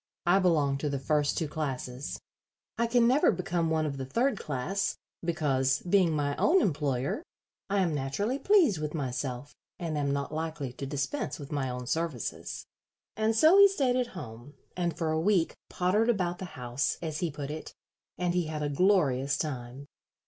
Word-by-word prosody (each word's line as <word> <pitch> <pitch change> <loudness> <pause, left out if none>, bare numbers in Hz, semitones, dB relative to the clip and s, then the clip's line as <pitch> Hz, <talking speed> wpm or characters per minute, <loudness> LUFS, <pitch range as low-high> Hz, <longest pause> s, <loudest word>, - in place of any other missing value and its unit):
I 175 +3 +5
belong 150 -7 +2
to 150 - -1
the 140 - -1
first 145 +2 +1
two 160 - 0
classes. 135 -3 -4 0.6
I 235 - +1
can 235 0 +4
never 265 +5 +5
become 175 -3 -1
one 160 -1 +1
of 140 -2 -3
the 135 - -4
third 250 - +1
class, 155 +8 -2 0.3
because, 145 -5 +1
being 180 -1 +3
my 145 -1 0
own 370 +4 +4
employer, 145 - 0 0.5
I 200 0 +2
am 170 -4 +1
naturally 175 - -1
pleased 340 - +4
with 150 +1 -3
myself, 130 -1 -3 0.2
and 165 -3 -3
am 140 -1 0
not 140 +1 -2
likely 155 -5 -3
to 135 +2 -6
dispense 145 - -2
with 140 -2 -9
my 140 -3 -1
own 125 0 -5
services." 160 -3 -3 0.5
And 220 +1 +1
so 320 - +6
he 400 - +10
stayed 275 -11 +1
at 250 -1 +1
home, 125 -1 -9 0.2
and 175 -2 -1
for 160 -2 0
a 160 0 +1
week 180 -2 +2 0.2
pottered 205 +6 +1
about 180 -6 0
the 190 - -4
house, 125 +2 -1
as 155 -2 -3
he 175 - 0
put 145 -1 -5
it, 155 +1 -7 0.4
and 175 -1 0
he 175 -1 +1
had 155 -1 -3
a 145 - 0
glorious 145 -5 +2
time. 130 -3 -5
155 Hz, 180 wpm, -29 LUFS, 140-185 Hz, 0.6 s, he